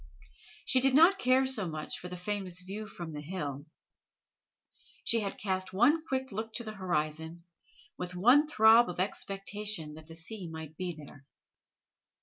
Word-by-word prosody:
She 260 - +4
did 265 0 +4
not 350 +6 +6
care 255 +1 +4
so 230 -8 0
much 155 -1 -5
for 180 - -7
the 180 0 -7
famous 185 -1 -3
view 200 +4 -6
from 170 -5 -7
the 150 - -5
hill. 150 -3 -5 1.4
She 230 - +3
had 200 -2 -3
cast 185 -2 -2
one 275 +11 +4
quick 265 -1 -2
look 220 +2 -5
to 235 - -3
the 215 -1 -6
horizon, 160 -3 -3 0.6
with 180 0 -5
one 250 - +5
throb 225 -4 +6
of 175 - -6
expectation 195 -3 -2
that 155 0 -12
the 165 - -10
sea 180 +2 -6
might 160 -1 -8
be 180 0 -4
there. 145 -2 -13
190 Hz, 160 wpm, -31 LUFS, 165-225 Hz, 1.4 s, not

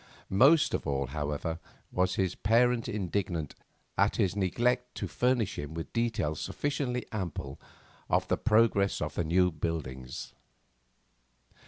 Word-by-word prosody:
Most 140 +11 +5
of - - -2
all, 70 -1 0
however, 75 +2 -2 0.3
was 90 0 +1
his 95 -2 +1
parent 115 +2 +2
indignant 90 -6 -2 0.5
at 100 +1 +3
his 100 -5 +1
neglect 120 +6 0
to - - -3
furnish 125 -5 0
him 75 +2 -6
with 80 - -6
details 115 -10 0
sufficiently 135 -4 -2
ample 85 - -4 0.5
of - - +2
the - - +2
progress 105 -3 +3
of - - -3
the - - 0
new 90 +3 +3
buildings. 75 -5 -4
95 Hz, 130 wpm, -30 LUFS, 80-115 Hz, 0.5 s, Most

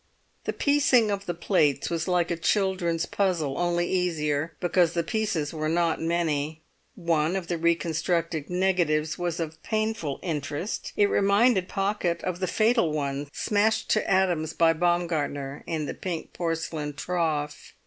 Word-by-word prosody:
The - - -1
piecing 275 -6 +3
of 200 0 -3
the 175 - -2
plates 165 -4 +1
was 165 +1 -1
like 180 -1 +1
a - - +1
children's 175 -2 0
puzzle, 170 -8 0
only 175 0 +1
easier, 160 -4 -1
because 175 -1 +2
the 170 - 0
pieces 170 -6 -1
were 155 -1 -2
not 170 0 +1
many. 160 -2 -1 0.3
One 165 -1 +1
of 190 -2 -2
the 170 0 -2
reconstructed 165 -1 0
negatives 175 -4 +1
was 175 -1 -2
of 160 -1 -5
painful 215 -10 -2
interest; 155 - -3
it 205 - +5
reminded 200 0 +3
Pocket 195 -3 -1
of 180 -1 -3
the 185 - -1
fatal 220 -4 +2
one 140 -1 -2
smashed 215 +5 +1
to 215 - +1
atoms 175 -5 +2
by 165 -1 +4
Baumgartner 160 -5 -1
in 160 -2 -2
the - - -4
pink 175 -4 -5
porcelain 165 -3 -3
trough. 155 -3 -2
170 Hz, 150 wpm, -26 LUFS, 155-185 Hz, 0.3 s, it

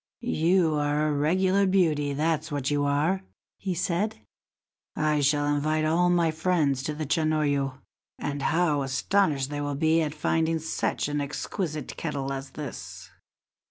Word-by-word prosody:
"You 175 -3 +4
are 145 +1 +1
a - - 0
regular 185 +7 +2
beauty, 155 -7 +2
that's 155 +2 -1
what 145 -1 -1
you 145 0 +1
are," 150 +7 +1 0.4
he 190 -3 -2
said; 180 - -1 0.8
"I 150 -1 +1
shall 145 +1 +2
invite 155 +2 +1
all 170 +3 +3
my 170 -2 +3
friends 155 -5 +1
to 150 - -2
the 155 0 -3
Chanoyu, 145 -3 +1 0.4
and 145 -1 -3
how 160 -3 +2
astonished 140 +1 +1
they 145 0 -3
will 145 -1 -2
be 160 +2 +3
at 150 -1 -2
finding 160 +1 +1
such 160 -2 -2
an 145 0 -1
exquisite 150 +1 -4
kettle 135 -1 -3
as 135 0 -6
this!" 145 +1 -8
155 Hz, 150 wpm, -27 LUFS, 145-165 Hz, 0.8 s, You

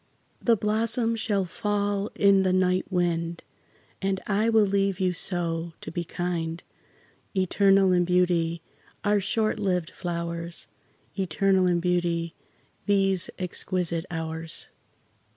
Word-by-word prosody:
The 230 -2 +3
blossoms 225 +2 +1
shall 205 -3 0
fall 205 +2 -1
in 200 -1 +5
the 190 -1 +2
night 185 +1 +1
wind, 170 -2 -1 0.6
And 195 -1 0
I 210 +2 +1
will 220 -2 +5
leave 195 -1 +1
you 185 -1 +1
so, 170 -2 -2
to - - -7
be 170 +1 -3
kind: 170 -1 -3 0.7
Eternal 195 +1 +4
in 180 -1 +4
beauty, 170 -2 +1 0.4
are 205 0 +3
short 215 +3 0
lived 180 -4 0
flowers, 170 -1 -4 0.5
Eternal 190 +1 +2
in 175 -1 +2
beauty, 170 -1 0 0.5
these 195 -3 +2
exquisite 180 -2 -2
hours. 160 -1 -4
185 Hz, 115 wpm, -26 LUFS, 170-200 Hz, 0.7 s, in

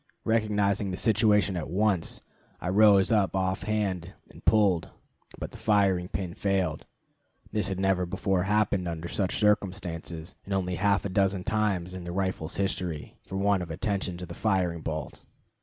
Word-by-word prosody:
Recognizing 105 -3 +1
the 90 - -3
situation 105 -3 +3
at 85 -4 -4
once, 95 -1 +1 0.4
I 90 - -3
rose 100 0 +5
up 105 -4 +2
offhand 95 -1 -1 0.2
and - - -15
pulled, 100 -6 +3 0.5
but - - -6
the - - -12
firing 100 -4 +2
pin 90 -2 -4
failed. 95 -6 -1 0.6
This 105 -2 +1
had 95 -2 -3
never 95 -2 +1
before 95 +1 0
happened 100 -1 +1
under 85 0 -4
such 95 +1 -1
circumstances, 90 -5 -1
and 100 - -3
only 90 -1 -1
half 100 +3 +2
a - - -1
dozen 95 -1 +1
times 100 -5 0
in 95 -1 -6
the 85 - -5
rifle's 95 -3 -2
history, 90 -5 -2
for 95 - -8
want 100 0 +2
of 85 - -5
attention 95 +1 -2
to 90 - -6
the 85 - -8
firing 90 -5 0
bolt. 80 -1 -5
95 Hz, 160 wpm, -28 LUFS, 90-100 Hz, 0.6 s, rose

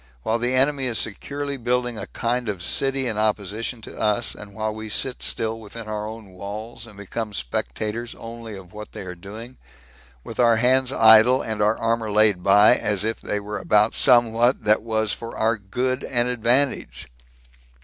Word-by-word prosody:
while 115 +1 0
the 120 +2 0
enemy 135 +1 +2
is 115 -3 -1
securely 140 +6 -3
building 125 0 -1
a - - -6
kind 120 0 -2
of 95 -4 -4
city 135 +6 0
in 110 -3 -2
opposition 110 +2 -2
to - - -9
us, 105 +2 +1
and 105 -1 -11
while 110 0 -2
we 110 0 -7
sit 130 +4 -2
still 115 0 -2
within 110 +1 -9
our 105 0 -3
own 110 -3 -9
walls, 105 +5 -7
and 105 -3 -15
become 105 +2 -5
spectators 110 - -3
only 115 -1 -8
of 95 0 -13
what 105 0 -9
they - - -7
are 90 -1 -6
doing, 110 +8 -10 0.7
with 115 - -9
our 120 -2 +5
hands 130 +3 +3
idle, 115 +2 +6
and 110 -2 -3
our 105 +2 +3
armor 115 -1 -1
laid 105 -3 +3
by, 100 +4 +6
as 105 -4 0
if 110 +1 -2
they 105 - -2
were 105 0 -5
about 105 +1 +3
somewhat 120 -1 +4
that 105 0 +3
was 110 -1 -1
for 115 0 -7
our 110 +1 +2
good 125 +6 -2
and 120 -1 +1
advantage. 125 - 0
110 Hz, 180 wpm, -23 LUFS, 105-120 Hz, 0.7 s, idle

